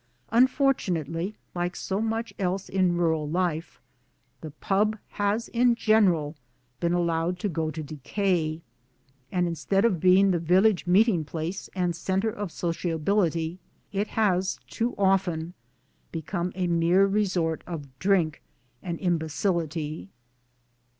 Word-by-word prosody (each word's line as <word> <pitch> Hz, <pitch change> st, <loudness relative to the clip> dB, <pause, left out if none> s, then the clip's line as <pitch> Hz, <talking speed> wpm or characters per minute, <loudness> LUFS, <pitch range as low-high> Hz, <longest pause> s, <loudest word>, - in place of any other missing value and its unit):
Unfortunately, 215 Hz, -, +1 dB, 0.2 s
like 175 Hz, 0 st, -2 dB
so 195 Hz, +2 st, -2 dB
much 225 Hz, +1 st, -2 dB
else 190 Hz, 0 st, -1 dB
in 185 Hz, -2 st, +2 dB
rural 160 Hz, -3 st, +1 dB
life, 170 Hz, -2 st, -2 dB, 0.6 s
the 155 Hz, -, -6 dB
Pub. 205 Hz, +8 st, 0 dB
has 205 Hz, +3 st, -1 dB
in 240 Hz, 0 st, +3 dB
general 185 Hz, -10 st, +3 dB, 0.4 s
been 170 Hz, -, 0 dB
allowed 170 Hz, 0 st, 0 dB
to 195 Hz, -, -2 dB
go 160 Hz, -3 st, -1 dB
to 155 Hz, 0 st, -5 dB
decay; 155 Hz, +2 st, -1 dB, 0.7 s
and 180 Hz, -1 st, +1 dB
instead 195 Hz, +5 st, +1 dB
of 195 Hz, -8 st, +2 dB
being] 185 Hz, +3 st, +5 dB
the 175 Hz, -, +1 dB
village 185 Hz, +4 st, +3 dB
meeting 190 Hz, -2 st, +4 dB
place 165 Hz, +5 st, -5 dB
and 180 Hz, -2 st, 0 dB
centre 190 Hz, +5 st, 0 dB
of 205 Hz, -4 st, -5 dB
sociability 170 Hz, 0 st, -1 dB, 0.3 s
it 205 Hz, +1 st, -1 dB
has 190 Hz, -4 st, +1 dB
too 235 Hz, +2 st, -2 dB
often 180 Hz, -4 st, +1 dB, 0.6 s
become 175 Hz, +2 st, -3 dB
a 185 Hz, -1 st, -1 dB
mere 170 Hz, +3 st, +4 dB
resort 190 Hz, -5 st, 0 dB
of 165 Hz, -5 st, -5 dB
drink 180 Hz, -5 st, +1 dB, 0.4 s
and 170 Hz, -2 st, -4 dB
imbecility. 160 Hz, -, -1 dB
180 Hz, 125 wpm, -26 LUFS, 165-200 Hz, 0.7 s, being